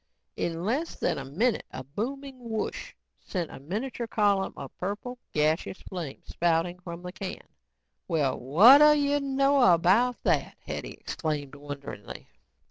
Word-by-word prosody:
In 170 Hz, +1 st, -2 dB
less 280 Hz, +10 st, -1 dB
than 170 Hz, -, -1 dB
a 135 Hz, -, -6 dB
minute 210 Hz, -, 0 dB
a 130 Hz, -, -7 dB
booming 260 Hz, -, -5 dB
whoosh 220 Hz, -1 st, -3 dB, 0.3 s
sent 175 Hz, -5 st, -4 dB
a -, -, -9 dB
miniature 225 Hz, -, -4 dB
column 205 Hz, -3 st, +1 dB
of 135 Hz, -, -8 dB
purple, 205 Hz, +7 st, -4 dB
gaseous 155 Hz, +5 st, 0 dB
flame 170 Hz, -7 st, -6 dB
spouting 175 Hz, +1 st, 0 dB
from 175 Hz, -1 st, -8 dB
the 180 Hz, -, -6 dB
can. 190 Hz, 0 st, -7 dB, 0.6 s
"Well 145 Hz, -5 st, +1 dB
whadda 250 Hz, -, +8 dB
you 290 Hz, 0 st, +2 dB
know 275 Hz, 0 st, +2 dB
about 200 Hz, +9 st, +3 dB
that?" -, -, +1 dB
Hetty -, -, -5 dB
exclaimed 150 Hz, -3 st, -3 dB
wonderingly. 145 Hz, -1 st, -8 dB
185 Hz, 135 wpm, -28 LUFS, 155-250 Hz, 0.6 s, whadda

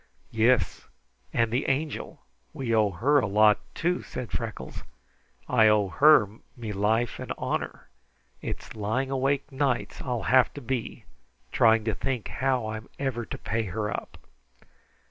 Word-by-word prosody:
"Yis; 110 Hz, -, +2 dB, 0.4 s
and 115 Hz, -1 st, +1 dB
the 125 Hz, +4 st, 0 dB
Angel 145 Hz, +3 st, -3 dB, 0.3 s
we 125 Hz, -4 st, -2 dB
owe 110 Hz, -2 st, +4 dB
her 135 Hz, -, +3 dB
a 115 Hz, -, 0 dB
lot, 105 Hz, +1 st, +5 dB, 0.2 s
too," 175 Hz, +2 st, 0 dB
said 125 Hz, -2 st, -7 dB
Freckles. -, -, -5 dB, 0.6 s
"I 115 Hz, -3 st, +5 dB
owe 105 Hz, -2 st, +3 dB
her 110 Hz, -, +5 dB, 0.2 s
me 115 Hz, -3 st, -5 dB
life 110 Hz, +4 st, 0 dB
and -, -, -6 dB
honor. -, -, -3 dB, 0.5 s
It's -, -, -6 dB
lying 110 Hz, +6 st, -1 dB
awake 135 Hz, +2 st, 0 dB
nights 135 Hz, -2 st, -1 dB
I'll 125 Hz, -3 st, -2 dB
have 130 Hz, -1 st, +4 dB
to 145 Hz, -, -7 dB
be 125 Hz, -1 st, -4 dB, 0.5 s
trying 110 Hz, -1 st, +4 dB
to 110 Hz, 0 st, -1 dB
think 125 Hz, -2 st, -3 dB
how 130 Hz, -3 st, 0 dB
I'm 110 Hz, 0 st, -6 dB
ever 125 Hz, -4 st, -2 dB
to -, -, -5 dB
pay 115 Hz, +1 st, -2 dB
her 105 Hz, +2 st, -3 dB
up." -, -, -6 dB
115 Hz, 145 wpm, -27 LUFS, 110-135 Hz, 0.6 s, lot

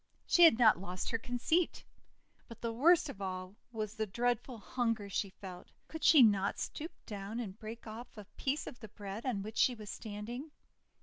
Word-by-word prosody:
She 350 Hz, -, +7 dB
had 275 Hz, -9 st, +7 dB
not 220 Hz, -7 st, +6 dB
lost 185 Hz, +2 st, -4 dB
her 230 Hz, -, 0 dB
conceit. 245 Hz, +9 st, 0 dB, 0.6 s
But 230 Hz, -2 st, -11 dB
the 230 Hz, -1 st, -2 dB
worst 320 Hz, +7 st, +5 dB
of 200 Hz, -8 st, -8 dB
all 185 Hz, 0 st, -4 dB, 0.2 s
was 215 Hz, -2 st, -3 dB
the 220 Hz, -1 st, -2 dB
dread 240 Hz, +3 st, +1 dB
ful 250 Hz, -3 st, -9 dB
hunger 225 Hz, -2 st, -2 dB
she 195 Hz, +1 st, -1 dB
felt. 185 Hz, -2 st, -10 dB, 0.2 s
Could 320 Hz, -, -7 dB
she 295 Hz, -6 st, +8 dB
not 200 Hz, -3 st, +3 dB
stoop 320 Hz, +4 st, -5 dB
down 205 Hz, +2 st, -5 dB
and 210 Hz, -3 st, -6 dB
break 225 Hz, +1 st, -8 dB
off 225 Hz, +2 st, -9 dB
a 210 Hz, -, -8 dB
piece 280 Hz, +3 st, -1 dB
of 245 Hz, -, -9 dB
the 220 Hz, -, -9 dB
bread 205 Hz, +5 st, -6 dB
on 205 Hz, -6 st, -1 dB
which 215 Hz, +2 st, -7 dB
she 250 Hz, -, +4 dB
was 215 Hz, -2 st, -8 dB
standing? 230 Hz, +7 st, -6 dB
225 Hz, 195 wpm, -34 LUFS, 200-245 Hz, 0.6 s, she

